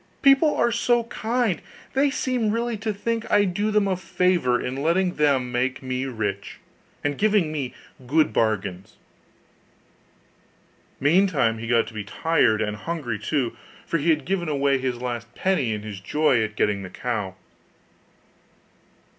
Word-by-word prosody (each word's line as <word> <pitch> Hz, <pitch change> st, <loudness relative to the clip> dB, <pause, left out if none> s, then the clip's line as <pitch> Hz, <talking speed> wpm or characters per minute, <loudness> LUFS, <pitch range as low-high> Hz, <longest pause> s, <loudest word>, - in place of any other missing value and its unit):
People 275 Hz, +2 st, +5 dB
are 235 Hz, -, +2 dB
so 235 Hz, 0 st, +2 dB
kind; 230 Hz, -4 st, -1 dB, 0.3 s
they 275 Hz, +2 st, +3 dB
seem 250 Hz, -4 st, 0 dB
really 230 Hz, +2 st, -1 dB
to 215 Hz, +1 st, -2 dB
think 225 Hz, +2 st, -3 dB
I 205 Hz, -, +4 dB
do 205 Hz, +3 st, -1 dB
them 210 Hz, -1 st, +2 dB
a 190 Hz, -, +1 dB
favour 175 Hz, -7 st, +1 dB
in 125 Hz, +1 st, -4 dB
letting 175 Hz, +4 st, +2 dB
them 135 Hz, -4 st, +2 dB
make 130 Hz, +2 st, -1 dB
me 130 Hz, 0 st, -2 dB
rich, 105 Hz, -5 st, -4 dB, 0.5 s
and 145 Hz, -1 st, -1 dB
giving 205 Hz, -7 st, +3 dB
me 140 Hz, -5 st, -4 dB, 0.3 s
good 155 Hz, +4 st, +3 dB
bargains.' 100 Hz, -4 st, -1 dB, 2.0 s
Meantime 145 Hz, -, +3 dB
he 115 Hz, -, -6 dB
began 115 Hz, -1 st, +3 dB
to -, -, -11 dB
be 105 Hz, -1 st, -4 dB
tired, 110 Hz, 0 st, +2 dB
and 105 Hz, 0 st, -3 dB
hungry 120 Hz, -3 st, -4 dB
too, 120 Hz, +1 st, -1 dB, 0.3 s
for 165 Hz, -, -1 dB
he 160 Hz, +4 st, 0 dB
had 155 Hz, -4 st, +2 dB
given 175 Hz, -3 st, -1 dB
away 140 Hz, -2 st, +2 dB
his 130 Hz, -1 st, -1 dB
last 120 Hz, -1 st, -5 dB
penny 185 Hz, -12 st, +1 dB
in 105 Hz, -1 st, -3 dB
his 105 Hz, -3 st, -7 dB
joy 130 Hz, +3 st, +2 dB
at 110 Hz, -1 st, -4 dB
getting 105 Hz, -1 st, +1 dB
the 95 Hz, -, -7 dB
cow. 105 Hz, -3 st, -3 dB
145 Hz, 155 wpm, -24 LUFS, 115-195 Hz, 2.0 s, People